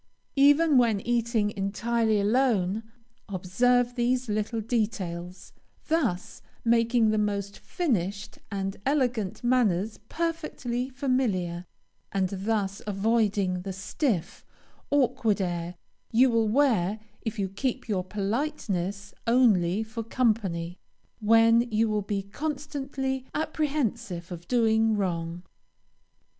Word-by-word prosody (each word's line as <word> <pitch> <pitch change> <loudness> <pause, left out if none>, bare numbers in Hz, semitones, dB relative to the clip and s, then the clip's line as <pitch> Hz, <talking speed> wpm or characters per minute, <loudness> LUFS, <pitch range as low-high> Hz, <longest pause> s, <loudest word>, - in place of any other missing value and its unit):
Even 290 0 +6
when 230 -4 +3
eating 235 -3 +1
entirely 220 +2 0
alone, 210 -3 +2 0.5
observe 240 +7 +2
these 250 +1 0
little 215 +2 -1
details, 195 -6 -3 0.4
thus 255 - -1 0.2
making 230 -1 +3
the 215 - +1
most 200 -1 -2
finished 205 - -2
and 195 -1 -3
elegant 245 -7 0
manners 220 -5 +1
perfectly 305 -7 -2
familiar, 225 - -1 0.4
and 190 -2 0
thus 195 0 -2
avoiding 200 -3 +1
the 195 +1 -5
stiff, 190 - -2 0.5
awkward 245 -6 +2
air 175 -1 -2 0.4
you 245 +2 +5
will 225 -1 +2
wear 220 -6 +2 0.2
if 225 -1 -4
you 195 -2 0
keep 255 +7 -3
your 195 -4 0
politeness 200 - -2
only 215 -6 +3
for 225 +1 -6
company, 210 -8 -1 0.4
when 230 +2 +5
you 225 0 +2
will 215 -1 0
be 200 -1 -2
constantly 270 +1 -4
apprehensive 250 - -2
of 175 -1 -8
doing 225 -2 +3
wrong. 170 -3 -2
220 Hz, 105 wpm, -27 LUFS, 195-245 Hz, 0.5 s, Even